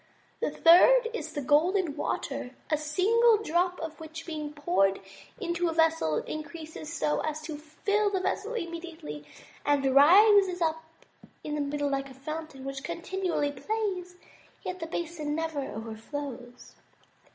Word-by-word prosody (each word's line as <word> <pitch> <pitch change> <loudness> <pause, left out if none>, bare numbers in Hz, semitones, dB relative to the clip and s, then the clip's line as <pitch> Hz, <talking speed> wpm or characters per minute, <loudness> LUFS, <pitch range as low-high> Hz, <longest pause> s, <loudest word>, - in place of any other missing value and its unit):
The - - 0
third 460 +9 +6
is 460 - -5
the 290 - -3
Golden 320 +3 +2
Water, 255 -3 -3 0.2
a 305 - +4
single 425 +10 +4
drop 360 -2 0
of 320 -1 -6
which 320 +1 -8
being 305 -3 -5
poured 290 - +1 0.4
into 345 -3 -1
a - - -2
vessel 320 - +2
increases 315 0 -7
so 300 -2 0
as 310 0 -2
to 310 -1 -5
fill 405 +7 0
the 390 -2 0
vessel 410 +5 -2
immediately, 335 - -6 0.4
and 275 -2 +2
rises 375 +5 +6
up 320 -1 0 0.6
in 300 - -4
the 300 - -1
middle 285 0 -1
like 275 0 -2
a 265 - -13
fountain, 305 0 -7
which 275 0 -5
continually 340 -3 -2
plays, 370 +3 -3
and 360 - -26 0.4
yet 365 0 -4
the 330 - -4
basin 320 -3 -3
never 320 -2 -2
overflows." 245 +2 -7
320 Hz, 145 wpm, -28 LUFS, 290-360 Hz, 0.6 s, third